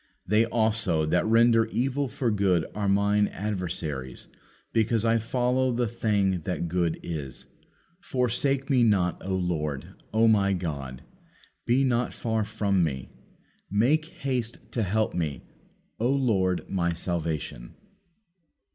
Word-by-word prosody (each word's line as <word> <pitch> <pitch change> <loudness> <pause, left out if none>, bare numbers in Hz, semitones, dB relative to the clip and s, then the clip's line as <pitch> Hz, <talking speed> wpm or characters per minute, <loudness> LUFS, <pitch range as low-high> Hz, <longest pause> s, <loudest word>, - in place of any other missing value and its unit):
They 105 +3 +3
also 110 -8 +1
that 90 +6 +1
render 115 0 +5
evil 135 +4 -1
for 120 -2 -1
good 95 -5 +2
are 105 -1 -1
Mine 100 +1 +3
adversaries; 85 - -4 0.5
because 115 0 +2
I 115 0 +3
follow 125 +3 +1
the 120 0 0
thing 100 -5 0
that 90 -2 -2
good 85 -1 0
is. 75 -6 -6 0.5
Forsake 135 - 0
Me 130 -3 +3
not, 100 -6 +2
O 95 0 -1
Lord; 75 -6 -2 0.2
O 115 +1 +4
My 100 -3 +4
God, 70 -8 -4 0.6
be 125 +3 +3
not 125 -2 +1
far 110 -2 -1
from 100 -3 0
Me. 65 -5 -3 0.6
Make 130 +10 +2
haste 125 -7 -3
to 120 - -1
help 110 +2 0
Me, 80 -5 -3 0.6
O 120 +3 +1
Lord 105 -10 +1
My 85 -3 0
salvation." 80 -8 -3
105 Hz, 130 wpm, -27 LUFS, 90-115 Hz, 0.6 s, render